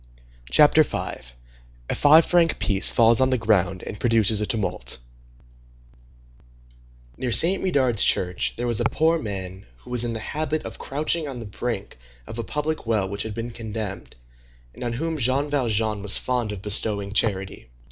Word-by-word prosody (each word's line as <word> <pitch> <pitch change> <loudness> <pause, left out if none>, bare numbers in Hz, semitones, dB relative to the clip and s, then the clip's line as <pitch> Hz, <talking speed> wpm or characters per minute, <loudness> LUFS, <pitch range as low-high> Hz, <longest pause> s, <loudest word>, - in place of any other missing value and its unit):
CHAPTER 65 - +5
V—A - - -7
FIVE 155 +3 +5
FRANC 170 -2 +2
PIECE 100 -1 +2
FALLS 115 +1 +4
ON 130 - +3
THE 130 - +1
GROUND 95 -5 0
AND 105 - -8
PRODUCES 110 -3 +2
A 105 - -2
TUMULT 95 - -1 2.2
Near 125 - -3
Saint 175 +10 +4
Médard's 130 - +2
church 90 0 +2
there 120 - -3
was 120 -3 -1
a - - 0
poor 165 +1 +1
man 95 -5 -6
who - - -13
was 120 -1 0
in 120 -1 -3
the 110 - -5
habit 155 +5 -3
of - - -8
crouching 155 +3 -2
on 135 -3 -7
the 115 - -8
brink 100 - -5 0.3
of 110 - -8
a - - -2
public 150 +4 -4
well 110 -4 0
which 100 +1 -4
had 110 -2 -4
been 115 +1 -5
condemned, 110 -3 -6 0.6
and - - -9
on 120 -1 -3
whom 160 +5 -3
Jean 135 +4 0
Valjean 110 -6 0
was 100 -1 +4
fond 125 -4 -2
of 100 -2 -8
bestowing 100 -1 +1
charity. 95 - -1
115 Hz, 165 wpm, -23 LUFS, 100-130 Hz, 2.2 s, CHAPTER